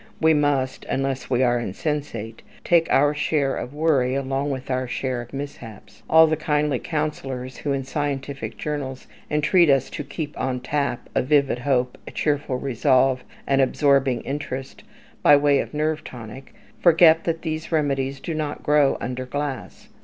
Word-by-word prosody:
We 160 0 +4
must 145 -3 0
unless 135 -1 -2
we 130 0 +2
are 120 -1 +2
insensate 120 - -4 0.2
take 170 -1 +3
our 145 +1 +4
share 145 -2 0
of 125 - -5
worry 145 -4 +1
along 135 +1 -1
with 135 -1 -4
our 130 0 -1
share 125 0 -2
of 120 - -11
mishaps. 135 -6 -9
All 160 0 +8
the 160 0 +1
kindly 150 -3 0
counsellors 135 -5 -4
who, 145 - -3
in 135 -1 -1
scientific 135 -5 -4
journals, 140 -3 -4 0.2
entreat 155 +3 +3
us 135 -2 +2
to 150 - -5
keep 150 +1 -6
on 130 -1 -1
tap 140 -2 -2
"a - - +2
vivid 140 -2 +2
hope, 125 -1 0
a - - -7
cheerful 145 -3 -1
resolve, 130 0 +2 0.2
an 135 0 +2
absorbing 135 -1 +2
interest," 135 -2 -5 0.4
by 145 - +7
way 145 -1 +3
of - - -3
nerve 155 +1 -1
tonic, 120 +2 -10 0.2
forget 165 -1 +6
that 165 -1 -2
these 160 0 -4
remedies 140 -3 0
do 165 - -4
not 155 -2 -4
grow 145 -2 +3
under 125 +1 -4
glass. 145 0 -5
140 Hz, 160 wpm, -23 LUFS, 130-150 Hz, 0.4 s, All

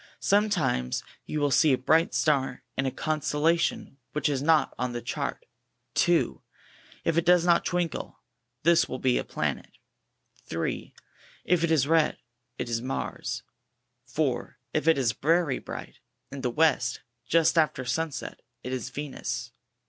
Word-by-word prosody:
Sometimes 195 - +1 0.2
you 155 - -2
will 145 -1 +1
see 150 +2 +5
a - - +3
bright 160 +6 +2
star 135 -4 +1
in 135 - 0
a - - 0
constellation 155 0 0
which 150 -1 +1
is 135 -2 0
not 155 +1 +3
on 125 -1 -1
the 120 - -3
chart. - - -3 0.5
2. - - +2 0.6
If 165 0 +3
it - - -1
does 175 0 +5
not 170 -1 +4
twinkle, 175 -3 -2 0.4
this 170 +1 +4
will 130 - -3
be 130 -1 +2
a - - -2
Planet. - - -3 0.8
3. 80 0 -3 0.5
If 175 -1 +2
it 170 - +2
is 150 -4 +3
red, 160 -1 +3 0.4
it - - -3
is 115 -1 -1
MARS. 130 +2 -4 0.6
4. - - -1 0.2
If 155 - 0
it 165 - +6
is 125 -5 +2
very 155 +1 +1
bright, - - -8 0.3
in 140 - -6
the 125 - 0
west, 130 -3 +2 0.3
just 165 0 +4
after 155 -5 +2
sunset, 155 +4 -3 0.2
it 125 - -4
is 125 -1 -3
VEXUS. 130 -3 -5
150 Hz, 150 wpm, -27 LUFS, 130-165 Hz, 0.8 s, it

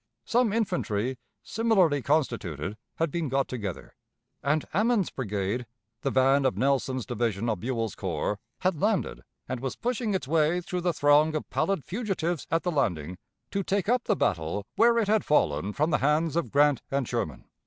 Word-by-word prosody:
Some 240 -2 +2
infantry, 130 - -1 0.2
similarly 195 -10 +2
constituted, 110 - -1 0.2
had 165 -2 0
been 165 -3 -2
got 135 +1 +1
together; 105 -8 -5 0.5
and 150 +3 +1
Ammen's 215 0 +2
brigade, 105 0 -2 0.3
the 135 - 0
van 135 +1 +4
of 130 - +1
Nelson's 130 -2 +1
division 115 -3 -1
of 110 -5 0
Buell's 115 -1 -2
corps, 105 - -2 0.2
had 180 -4 0
landed, 210 -1 0 0.3
and 130 -1 -3
was 130 +1 -3
pushing 235 -4 -1
its 185 - -2
way 160 +3 +2
through 180 0 -4
the 175 0 +1
throng 150 +1 +4
of 155 - -3
pallid 195 -7 0
fugitives 180 - -2
at 165 - +1
the 180 - 0
landing 90 - -1 0.3
to 200 - 0
take 195 0 -1
up 245 +1 +2
the 210 - +2
battle 85 - -1
where 235 0 +5
it 225 -3 +2
had 215 0 +3
fallen 95 - +2
from 150 +9 0
the - - +2
hands 150 +3 +2
of 170 - 0
Grant 145 -2 +3
and 135 -3 -1
Sherman. 80 - -3
145 Hz, 175 wpm, -27 LUFS, 120-180 Hz, 0.5 s, where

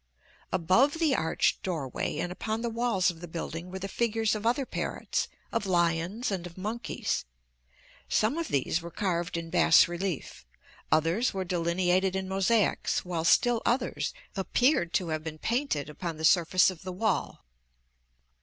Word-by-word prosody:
Above 185 - +3
the 325 -4 +2
arched 160 - +1
doorway 155 -9 -3
and 175 - -2
upon 220 +4 -3
the 235 - -1
walls 225 -6 +1
of 165 -1 -14
the 175 - -7
building 165 +1 -5
were 190 - -6
the 190 +1 -4
figures 225 +1 0
of 215 +1 -2
other 255 +3 +1
parrots, - - -2 0.2
of 230 -3 -1
lions, 175 +5 +1
and 180 -3 -3
of 170 - -14
monkeys. 215 +5 -3 0.9
Some 215 +6 +2
of 335 - -2
these 140 +5 0
were 170 - -7
carved 175 -3 -2
in 165 -1 -6
bas 165 - +6
relief; 175 - -4 0.5
others 165 - +2
were 190 -1 -2
delineated 180 +2 +1
in 190 0 -2
mosaics, 195 +2 +1
while 170 -2 -2
still 235 +7 +4
others 245 +3 0 0.2
appeared 195 - +2
to 180 -3 0
have 155 -1 -2
been 155 -1 -6
painted 230 - -1
upon 160 +2 -5
the 160 - -1
surface 180 +2 +5
of 175 - -12
the 185 - -6
wall. 195 +1 -1
185 Hz, 160 wpm, -28 LUFS, 170-220 Hz, 0.9 s, bas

